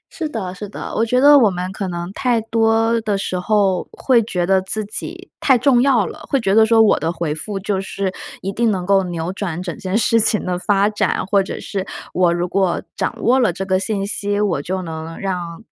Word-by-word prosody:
是 320 -3 -3
的 195 -9 -4
是 205 +2 -8
的， - - -7
我 225 - +2
觉 250 +2 +1
得 290 +2 +7
我 225 -5 +5
们 180 0 -4
可 195 0 -4
能 175 0 -5
太 240 +1 +1
多 225 +1 +1
的 210 -2 -1
时 185 -2 -3
候 195 -1 +1
会 250 -3 +3
觉 180 -5 -2
得 190 +1 +3
自 210 +3 -4
己 350 - -7
太 265 -3 +4
重 245 0 +3
要 250 -7 +3
了， - - -8
会 275 - +2
觉 195 -5 0
得 220 +1 +5
说 225 0 +5
我 215 - +3
的 160 +2 -1
回 170 -3 -2
复 195 +6 -5
就 195 -1 -2
是 195 -1 -3 0.3
一 195 - -2
定 235 +2 +1
能 185 -4 -1
够 195 +1 +4
扭 170 0 -4
转 180 -4 -4
整 175 -3 -5
件 190 +1 -1
事 230 0 +3
情 215 -1 +1
的 180 -1 -2
发 200 +1 +2
展， 210 -3 -1
或 195 +1 +3
者 190 - -5
是 195 -2 -4 0.3
我 180 -1 +3
如 175 +1 -1
果 190 -1 0
掌 - - -2
握 255 +3 +4
了 235 -7 +3
这 190 +3 -5
个 185 0 +1
信 195 0 -2
息， 205 0 -2
我 195 -9 0
就 185 +4 -3
能 160 -1 -7
让 180 -1 -4
195 Hz, 245 characters per minute, -19 LUFS, 180-225 Hz, 0.3 s, 得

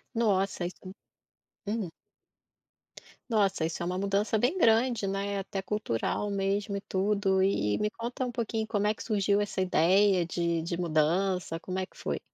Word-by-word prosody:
Nossa 195 -5 +1
isso. 185 +1 -9 0.8
Hum. 210 -4 -2 1.4
Nossa 200 -7 +2
isso 165 - -3
é 170 - -2
uma 180 +1 -2
mudança 200 +3 +1
bem 250 - +1
grande 230 - +3
né, 195 +1 -2
é 200 - -1
até 195 0 -4
cultural 205 - -1
mesmo 200 +1 -1
e - - -3
tudo. 195 0 +1
E 195 - +2 0.2
e - - -4
me 210 - +1
conta 235 +3 -4
um 245 - -4
pouquinho 225 -2 -2
como 210 -1 0
é 215 - +2
que - - -9
surgiu 205 -2 +2
essa 205 -2 -2
ideia 185 +1 +4
de 170 -1 0
de 170 +1 -3
mudança 170 +1 +1
como 185 +1 -4
é 185 - -1
que - - -26
foi? - - -3
195 Hz, 175 wpm, -29 LUFS, 185-210 Hz, 1.4 s, ideia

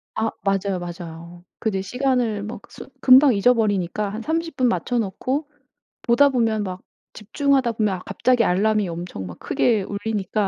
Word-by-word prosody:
아 225 0 0 0.2
맞아요, 195 -1 0
맞아요. 175 0 -9 0.2
근데 195 -4 -1
시간을 245 -1 -1
막 215 - -7
쓰 - - -11
금방 265 +1 +7
잊어버리니까 205 -3 +1
한 215 +3 -5
30 325 +3 -2
분 255 - +2
맞춰 245 0 0
놓고 255 +8 -2 0.5
보다 280 +4 +4
보면 225 -4 0
막 185 -1 -6 0.3
집중하다 260 +2 0
보면 210 -3 0
아 - - -7
갑자기 250 -2 +2
알람이 210 +2 +2
엄청 170 - -6
막 90 -1 -10
크게 220 -5 +1
울리니까 205 0 -2
215 Hz, 315 characters per minute, -22 LUFS, 190-250 Hz, 0.5 s, 금방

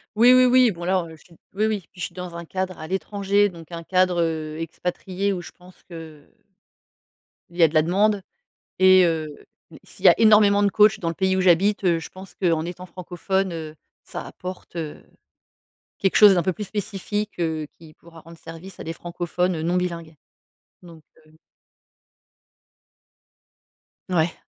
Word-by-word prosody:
Oui, 235 +3 +6
oui, 255 0 +6
oui, 250 -1 +5
bon 175 -4 -6
là, 185 +1 +1
heu, 160 -1 -11
je 155 - -21
suis 175 - -21 0.2
oui 210 +2 +1
oui 215 -1 0
puis 180 - -18
je - - -2
suis - - -9
dans 180 -2 -8
un 170 0 -7
cadre 185 +1 -4
à 155 - -8
l'étranger, 200 +1 0
donc 170 -1 -14
un 170 -1 -6
cadre, 180 0 +1
heu, 160 -1 -3
expatrié, 180 +4 -3
où 180 - -4
je 170 - -10
pense 180 0 -19
que 160 -3 -11 1.2
il 175 - -15
y 175 - +5
a - - +8
de 155 - -9
la 155 - +5
demande, 200 +5 +1 0.6
et, 185 0 +6
heu, 160 -2 -1 0.6
s'il - - -16
y - - +10
a - - +7
énormément 210 -2 +5
de 200 - +3
coachs 215 +2 +4
dans 170 - -2
le 165 - -3
pays 190 0 0
où - - +1
j'habite, 190 +3 +3
heu, 170 -2 +3
je 165 - -8
pense 190 0 -13
qu'en 165 -4 0
étant 180 +1 -7
francophone, 185 +1 -3
heu. 155 -2 -7 0.3
Ça - - -7
apporte, 180 -1 -9
heu, 160 -3 -6 1.0
quelque 195 - +1
chose 210 -2 +8
d'un 175 -2 +1
peu 185 - +1
plus 210 - -6
spécifique, 205 0 -4
heu, 160 -2 -2
qui 160 -2 -16
pourra 165 0 -16
rendre 165 +1 -14
service 165 +5 -11
à - - -6
des 165 - -5
francophones, 175 +1 -3
heu, 155 - -4
non 175 +2 0
bilingues, 170 -3 -4 0.7
donc 165 -3 -14 0.2
heu 155 0 -23 2.7
Mouais. 170 -2 +1
180 Hz, 185 wpm, -23 LUFS, 165-195 Hz, 2.7 s, y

